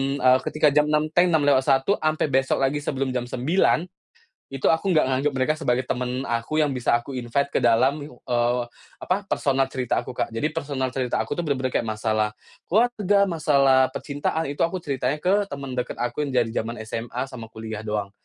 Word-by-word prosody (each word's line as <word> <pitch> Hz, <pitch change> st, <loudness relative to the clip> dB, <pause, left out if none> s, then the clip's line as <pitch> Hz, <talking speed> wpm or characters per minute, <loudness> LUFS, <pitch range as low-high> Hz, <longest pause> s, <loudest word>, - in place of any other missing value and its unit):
eee, 130 Hz, -1 st, +4 dB
ketika 150 Hz, -1 st, +3 dB
jam 150 Hz, +1 st, +3 dB
6.00 150 Hz, +1 st, +1 dB
teng 175 Hz, +2 st, +4 dB
lewat -, -, 0 dB
6.01 135 Hz, +3 st, +3 dB
sampai 155 Hz, 0 st, 0 dB
besok 135 Hz, +1 st, +1 dB
lagi 140 Hz, +2 st, +1 dB
sebelum 135 Hz, -2 st, -2 dB
jam 125 Hz, -1 st, -3 dB
9.00, 155 Hz, +6 st, +1 dB, 0.7 s
itu 135 Hz, -, +2 dB
aku 175 Hz, +3 st, +1 dB
nggak 155 Hz, -, +5 dB
nganggap 140 Hz, +3 st, +1 dB
mereka 130 Hz, +3 st, +1 dB
sebagai 125 Hz, -4 st, +1 dB
temen 125 Hz, 0 st, -2 dB
aku 135 Hz, +5 st, -1 dB
yang 145 Hz, -, +1 dB
bisa 125 Hz, -3 st, +1 dB
aku 120 Hz, +3 st, -1 dB
invite 125 Hz, +4 st, -1 dB
ke -, -, +1 dB
dalam, 125 Hz, +5 st, +3 dB
eee, 120 Hz, -1 st, -1 dB, 0.4 s
apa, 195 Hz, +2 st, -1 dB
personal 135 Hz, -5 st, +1 dB
cerita 130 Hz, -2 st, -2 dB
aku 125 Hz, -, -5 dB
Kak -, -, -2 dB
jadi 115 Hz, +7 st, -1 dB
personal 135 Hz, -5 st, -3 dB
cerita 125 Hz, -2 st, -1 dB
aku -, -, -2 dB
tuh 175 Hz, -, -2 dB
bener-bener 130 Hz, -4 st, -2 dB
kayak -, -, +2 dB
masalah, 110 Hz, 0 st, 0 dB, 0.4 s
keluarga, 205 Hz, -2 st, +3 dB
masalah 140 Hz, -6 st, +3 dB
percintaan 145 Hz, +3 st, -3 dB
itu 140 Hz, +1 st, -2 dB
aku 170 Hz, +3 st, 0 dB
ceritanya 145 Hz, -2 st, -2 dB
ke 185 Hz, +5 st, +2 dB, 0.2 s
temen 135 Hz, -2 st, -6 dB
deket 125 Hz, 0 st, -3 dB
aku 120 Hz, +4 st, -2 dB
yang 145 Hz, -, -2 dB
dari 120 Hz, -3 st, +1 dB
zaman 115 Hz, +2 st, -3 dB
SMA 115 Hz, +2 st, -4 dB
sama 115 Hz, -4 st, -10 dB
kuliah 110 Hz, -1 st, -7 dB
doang, 105 Hz, -2 st, -3 dB
135 Hz, 190 wpm, -24 LUFS, 125-150 Hz, 0.7 s, nggak